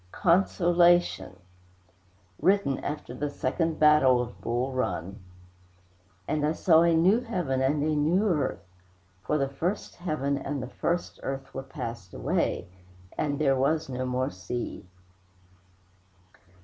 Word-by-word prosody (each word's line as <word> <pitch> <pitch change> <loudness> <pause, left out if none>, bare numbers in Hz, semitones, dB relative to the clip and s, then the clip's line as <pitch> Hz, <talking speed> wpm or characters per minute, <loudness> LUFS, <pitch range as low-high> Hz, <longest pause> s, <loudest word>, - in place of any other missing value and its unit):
CONSOLATION 175 -1 +3 1.0
WRITTEN 190 -8 +2
AFTER 145 -4 -5
THE 145 +3 -3
SECOND 155 +4 -1
BATTLE 150 -5 +5
OF 120 0 -5
BULL 120 +3 -1
RUN 95 -6 -3 1.1
"And 155 -1 -1
I 150 +2 +2
saw 165 -1 +4
a 170 -1 +4
new 185 +8 +4
heaven 180 - -2
and 145 +2 +1
a 155 0 +1
new 170 +8 +2
earth: 150 - -1 0.6
for 150 - 0
the 135 -2 0
first 170 +9 -3
heaven 155 -5 -2
and 140 +1 -4
the - - -5
first 170 +6 -2
earth 135 0 -5
were 135 - -4
passed 115 -8 -7
away; - - -1 0.5
and 145 -2 -1
there 140 -2 +2
was 155 +4 0
no 130 0 -3
more 130 +1 -1
sea." 95 +3 -6
145 Hz, 130 wpm, -27 LUFS, 130-170 Hz, 1.1 s, BATTLE